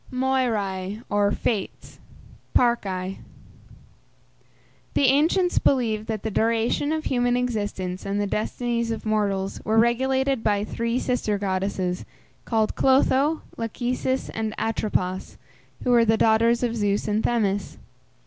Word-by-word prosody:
MOIRÆ 225 -6 -1
OR 205 0 +3
FATES 210 -4 -3 0.6
(PARCÆ). 195 -6 +1 1.8
The - - +3
ancients 320 +7 +3
believed 220 -5 +1
that 220 -3 -3
the 220 - -2
duration 230 +7 +1
of 315 0 -1
human 245 -3 +1
existence 205 -7 -2
and 200 +1 -2
the 205 - +1
destinies 235 +3 -2
of 225 0 -4
mortals 200 -3 -1
were 220 +1 +1
regulated 260 +2 +2
by 205 -1 +1
three 230 +2 -2
sister 250 -5 0
goddesses, 190 -2 -2 0.4
called 220 -2 +1
Clotho, 270 +3 +3
Lachesis, 250 +3 -2
and 220 -1 -3
Atropos, 190 -4 -2 0.5
who 250 - +1
were 235 -1 +6
the 225 0 +3
daughters 230 +2 +3
of 235 -1 0
Zeus 205 -2 0
and 210 +1 0
Themis. 205 -4 0
225 Hz, 120 wpm, -24 LUFS, 205-245 Hz, 1.8 s, were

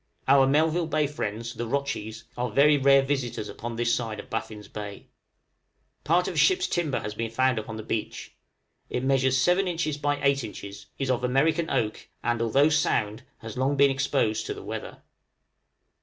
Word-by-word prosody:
Our 135 0 +6
Melville 160 +4 +2
Bay 155 -1 +1
friends, 115 -5 -4
the 120 0 -4
rotchies, 140 -5 -3
are 125 0 -2
very 150 +2 +5
rare 135 -1 +5
visitors 135 -6 -2
upon 120 +1 -6
this 115 0 +1
side 110 -3 -2
of - - -11
Baffin's 105 -2 -5
Bay. 100 -1 -8 0.9
Part 170 +5 +2
of - - -3
a - - -6
ship's 370 -1 +4
timber 155 -7 -1
has 105 - -5
been 115 +1 -3
found 130 +1 +1
upon 110 +1 -7
the 110 - -6
beach; 110 0 -4 0.5
it 125 - -2
measures 130 -1 +2
7 180 +7 +3
inches 160 -4 -2
by 145 0 0
8 140 -1 +2
inches, 100 -2 -8
is 135 -1 0
of 125 -1 -1
American 155 +6 +2
oak, 110 -5 -2
and, 120 -1 0
although 135 +6 +4
sound, 110 -8 +1 0.2
has 115 0 -8
long 135 +2 +1
been 140 0 +5
exposed 135 -5 0
to - - -3
the - - -9
weather. - - -7
130 Hz, 180 wpm, -26 LUFS, 115-145 Hz, 0.9 s, Our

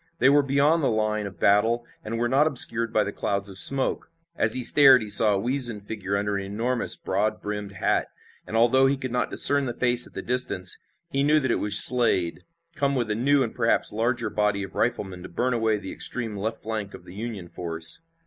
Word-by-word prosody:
They 130 - +3
were 145 +1 +4
beyond 140 +4 +1
the 140 - 0
line 110 -2 -2
of 90 -4 -13
battle 110 +4 +1 0.2
and 115 +2 -6
were 120 +1 -1
not 135 +5 +1
obscured 115 -5 0
by 110 -2 +1
the 100 - -5
clouds 100 0 -4
of 95 -1 -1
smoke. 135 -1 +4 0.3
As 110 -7 +3
he 130 - -3
stared 135 -3 +6
he 105 - -5
saw 105 0 +4
a - - -2
weazened 120 -2 0
figure 100 -2 -5
under 100 0 -3
an 100 - -5
enormous, 115 +5 0
broad 105 +3 -3
brimmed 105 -1 -7
hat, 95 - -2 0.4
and, 110 - -4
although 130 +3 +3
he 140 +1 -1
could 130 -2 -6
not 125 - -2
discern 140 -1 +4
the 120 - -6
face 125 -1 +3
at - - -19
the - - -7
distance, 120 -7 +1 0.3
he 135 - -1
knew 150 +2 +3
that 130 -4 -2
it - - -1
was 105 0 +5
Slade, 110 -10 +1 0.4
come 140 0 -1
with 120 -4 -2
a - - -1
new 135 +4 +1
and 115 - -6
perhaps 115 -2 -1
larger 115 0 -3
body 105 -1 -1
of 95 - -9
riflemen 95 -6 -3
to - - -11
burn 125 +1 -2
away 110 -2 -1
the 100 -2 -9
extreme 115 -4 -3
left 110 +3 -6
flank 110 -2 -6
of - - -15
the 90 - -13
Union 105 -3 -7
force. 85 - +4
115 Hz, 225 wpm, -23 LUFS, 105-125 Hz, 0.4 s, stared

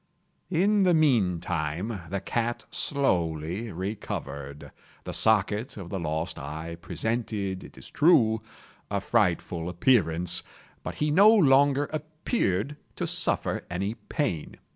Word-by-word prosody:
In 200 +4 +3
the 180 -3 +4
meantime 90 - 0
the 100 +2 -2
cat 120 +3 -2
slowly 90 - 0
recovered. 70 -7 -6 0.3
The - - -6
socket 110 +2 +2
of 90 -4 -8
the 95 - -2
lost 80 +1 -2
eye 80 +2 -6
presented, 100 -1 -2
it - - -13
is - - -11
true, 115 -9 +4 0.5
a - - 0
frightful 85 -1 0
appearance, 90 -3 +2 0.4
but - - -6
he 150 0 0
no 200 +7 +7
longer 145 -7 +5
appeared 150 - -1 0.2
to - - -2
suffer - - 0
any 95 +4 -2
pain. 115 - -3
105 Hz, 120 wpm, -27 LUFS, 85-140 Hz, 0.5 s, no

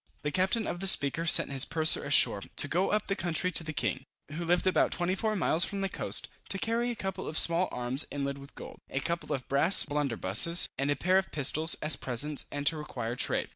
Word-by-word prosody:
The 150 - -3
captain 190 +5 -1
of 175 - -5
the 195 - -2
Speaker 165 -1 +5
sent 155 - +4
his 135 -1 +5
purser 160 0 +2
ashore, 140 -7 +3
to 145 - -2
go 180 +6 -1
up 210 0 -1
the 195 - -3
country 175 0 -1
to 165 - +2
the 160 - -6
king, 130 -3 -3 0.3
who 165 +3 -6
lived 175 +2 0
about 185 - +1
24 190 +5 -2
miles 175 -3 +1
from 200 -1 -1
the 195 - -2
coast, - - -2 0.2
to 195 - -2
carry 230 +4 -2
a 240 - -4
couple 190 -3 -6
of 155 - -3
small 170 +2 +3
arms 125 +3 0
inlaid 140 -1 -5
with 140 +1 -15
gold, - - -11
a 135 - -3
couple 170 +4 -5
of 130 - -4
brass 140 +8 +2
blunderbusses, 145 - +1
and 140 +1 -3
a 145 - 0
pair 185 +7 +1
of 190 - -7
pistols, 155 +3 +3
as 155 0 +2
presents, 140 +4 +1
and 145 0 -6
to 160 +2 +2
require 120 -6 -6
trade. - - +1
160 Hz, 225 wpm, -28 LUFS, 140-185 Hz, 0.3 s, Speaker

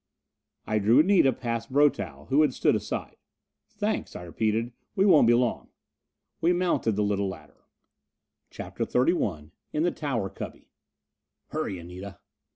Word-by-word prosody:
I 110 - 0
drew 110 +6 +5
Anita 180 -6 +4
past 115 -1 -4
Brotow, 145 +1 +1
who 140 +3 +4
had 145 -5 +2
stood - - +3
aside. - - -4 0.5
"Thanks," - - -3
I - - -7
repeated. 110 +6 -1 0.2
"We 195 - +3
won't 155 - +6
be 120 - +6
long." 120 -1 0 0.7
We 170 +2 +4
mounted 175 -10 +1
the 105 - +1
little 100 -1 0
ladder. 95 - -10 0.8
CHAPTER - - -5
XXXI 100 - 0 0.2
In 150 - +1
the 175 - +2
Tower 125 -13 -3
Cubby - - -9 0.8
"Hurry, 95 - -3
Anita!" 90 +3 -9
115 Hz, 140 wpm, -27 LUFS, 100-150 Hz, 0.8 s, won't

